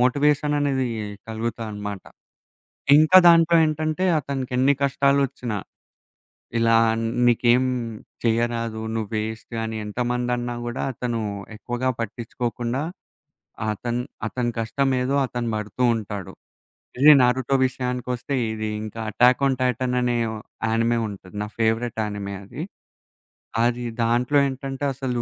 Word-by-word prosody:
Motivation 145 Hz, +3 st, +2 dB
అనేది 135 Hz, -3 st, +1 dB, 0.4 s
కలుగుతానమాట. 110 Hz, -3 st, -4 dB, 0.9 s
ఇంకా 155 Hz, +5 st, +7 dB
దాంట్లో 170 Hz, 0 st, +6 dB
ఏంటంటే, 155 Hz, +3 st, -1 dB
అతకెన్ని 135 Hz, -1 st, +1 dB
కష్టాలోచ్చినా, 140 Hz, -5 st, +1 dB, 1.0 s
ఇలా 115 Hz, 0 st, +4 dB, 0.5 s
మీకేం 120 Hz, +1 st, +4 dB, 0.6 s
చేయరాదు, 115 Hz, -1 st, 0 dB
నువ్వు 110 Hz, -2 st, -3 dB
వేస్టు 110 Hz, +2 st, -4 dB
అని 110 Hz, 0 st, -4 dB
ఎంతమందన్నా 120 Hz, +2 st, -1 dB
గుడా, 120 Hz, +1 st, -3 dB
అతను 120 Hz, 0 st, -2 dB, 0.4 s
ఎక్కువగా 120 Hz, +3 st, -2 dB
పట్టించుకోకుండా, 120 Hz, +3 st, -3 dB, 0.9 s
అతన్ 120 Hz, +3 st, -2 dB, 0.3 s
అతని 120 Hz, +1 st, -2 dB
కష్టమేదో 130 Hz, +3 st, 0 dB
అతను 120 Hz, -2 st, -3 dB
బడుతూ 105 Hz, +3 st, -3 dB
ఉంటాడు. 105 Hz, -4 st, -5 dB, 0.7 s
ఇది 150 Hz, +2 st, +9 dB
నరుటో 125 Hz, +2 st, +2 dB
విషయానికొస్తే 125 Hz, 0 st, -3 dB, 0.2 s
ఇది 110 Hz, 0 st, -3 dB, 0.2 s
ఇంకా 110 Hz, +1 st, -7 dB
'అటాక్న్‌ 125 Hz, +5 st, +4 dB
ఆన్ -, -, +1 dB
టాటన్' 125 Hz, 0 st, 0 dB
అనే 120 Hz, -1 st, +1 dB
యానిమే 115 Hz, +1 st, -1 dB
ఉంటది. 95 Hz, -2 st, -10 dB
నా 105 Hz, -, -3 dB
ఫేవరెట్ 115 Hz, +1 st, 0 dB
యానిమే 100 Hz, -1 st, -4 dB
అది. 140 Hz, +10 st, -7 dB, 1.0 s
అది 120 Hz, +1 st, +1 dB, 0.2 s
దాంట్లో 120 Hz, +5 st, +2 dB
ఏంటంటే, 135 Hz, +1 st, -5 dB
అసలు 125 Hz, -2 st, -2 dB
120 Hz, 105 wpm, -23 LUFS, 115-130 Hz, 1.0 s, ఇది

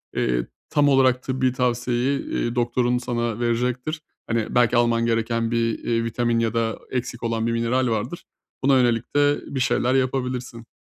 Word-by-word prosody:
eee, -, -, 0 dB, 0.2 s
tam 145 Hz, -1 st, +3 dB
olarak 130 Hz, -2 st, +3 dB
tıbbi 130 Hz, -1 st, 0 dB
tavsiyeyi, 125 Hz, +2 st, 0 dB
eee, 120 Hz, 0 st, -3 dB
doktorun 120 Hz, 0 st, +1 dB
sana 120 Hz, -2 st, -2 dB
verecektir. 125 Hz, +6 st, -1 dB, 0.3 s
Hani, 115 Hz, 0 st, -1 dB
belki 120 Hz, 0 st, +4 dB
alman 115 Hz, -1 st, +2 dB
gereken 115 Hz, 0 st, 0 dB
bir, 115 Hz, -1 st, 0 dB
eee, 115 Hz, -1 st, -1 dB
vitamin 115 Hz, 0 st, 0 dB
ya 115 Hz, -1 st, 0 dB
da 115 Hz, -1 st, -1 dB
eksik 125 Hz, -2 st, -4 dB
olan 115 Hz, 0 st, -1 dB
bir -, -, 0 dB
mineral 115 Hz, +2 st, +1 dB
vardır, 115 Hz, +8 st, -3 dB, 0.4 s
buna 135 Hz, 0 st, +5 dB
yönelik 120 Hz, -1 st, 0 dB
de 145 Hz, 0 st, +3 dB, 0.2 s
bir 130 Hz, -, 0 dB
şeyler 125 Hz, 0 st, +1 dB
yapabilirsin. 125 Hz, -3 st, -2 dB
120 Hz, 160 wpm, -23 LUFS, 115-130 Hz, 0.4 s, buna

